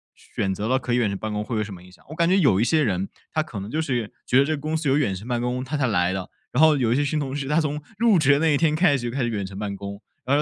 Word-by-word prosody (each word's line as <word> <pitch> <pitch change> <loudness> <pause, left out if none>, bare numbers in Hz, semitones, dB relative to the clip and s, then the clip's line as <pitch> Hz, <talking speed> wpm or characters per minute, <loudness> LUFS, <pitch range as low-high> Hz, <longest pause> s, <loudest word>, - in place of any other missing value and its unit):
选 95 - -3
择 105 +3 -3
了 130 - +3
可 125 -2 -3
以 - - +3
远 115 -4 +2
程 100 - -3
办 110 +1 -4
公， 105 0 -2
会 115 +1 -4
有 110 - +1
什 105 -2 -7
么 90 - -11
影 90 0 -16
响， - - -21
我 155 - -7
感 170 +1 +2
觉 190 - +4
有 135 - +4
一 - - +4
些 155 +4 +2
人 95 -4 -1 0.2
他 155 - +1
可 120 -10 -6
能 100 +4 -7
就 160 - 0
是 120 -8 -2 0.2
觉 125 - +3
得 140 - +5
这 155 - 0
个 - - -7
公 155 +2 -2
司 155 -3 -1
有 135 - +3
远 105 -10 +1
程 100 +5 -9
办 120 -1 -1
公， 125 +1 -2
他 135 +4 -4
才 135 -3 +1
来 90 -4 +1
的。 95 -1 -5 0.2
然 135 - +1
后 155 -1 +6
有 120 -5 +1
一 - - +3
些 145 +1 +1
新 150 +1 -1
同 135 -1 -3
事 140 -2 -3
他 150 +3 +2
从 150 0 -2 0.2
入 230 -5 +5
职 145 -3 +4
的 140 - +2
那 160 0 +3
一 145 - +3
天 155 -1 +2
开 155 -4 +4
始， 120 -1 -3
就 120 - -7
开 135 - -1
始 120 - 0
远 100 -4 -2
程 95 0 -9
办 100 -1 -3
公， 100 +1 -7 0.2
然 140 +2 +2
后 150 - +3
125 Hz, 400 characters per minute, -24 LUFS, 105-150 Hz, 0.2 s, 后